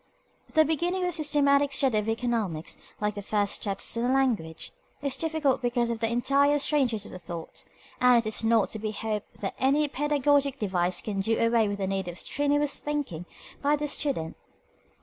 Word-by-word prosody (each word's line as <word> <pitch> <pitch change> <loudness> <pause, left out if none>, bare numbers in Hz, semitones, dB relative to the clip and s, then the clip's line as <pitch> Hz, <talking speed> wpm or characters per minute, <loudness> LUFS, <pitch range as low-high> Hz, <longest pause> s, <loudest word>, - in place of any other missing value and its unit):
The 315 0 +6
beginning 345 +4 0
of 360 - +1
the - - -4
systematic 285 -3 +2
study 265 -5 +3
of 210 +1 -3
economics, 225 -8 -2 0.2
like 210 0 0
the 205 - -6
first 205 0 0
steps 200 +1 -1
in 230 - -1
a 245 - +1
language, 230 -12 0 0.3
is 275 -2 +1
difficult 315 -5 0
because 240 -1 0
of 230 - -3
the 225 -1 0
entire 275 +5 +3
strangeness 265 -7 +1
of - - -10
the 185 - -8
thought, 170 -2 -7 0.4
and 250 -1 +6
it 230 - +1
is 215 - 0
not 225 -2 +3
to 220 - -4
be 215 0 -3
hoped 215 0 -4
that 195 - -2
any 285 +3 +3
pedagogic 285 -1 +1
device 180 -5 0
can 205 -2 -3
do 225 +4 +1
away 230 -1 +3
with 205 0 -3
the 195 - -2
need 190 -1 -2
of 175 0 -5
strenuous 290 +4 0
thinking 280 - -4 0.3
by 290 +1 +3
the 295 0 -3
student. 275 - -2
240 Hz, 190 wpm, -27 LUFS, 210-285 Hz, 0.4 s, The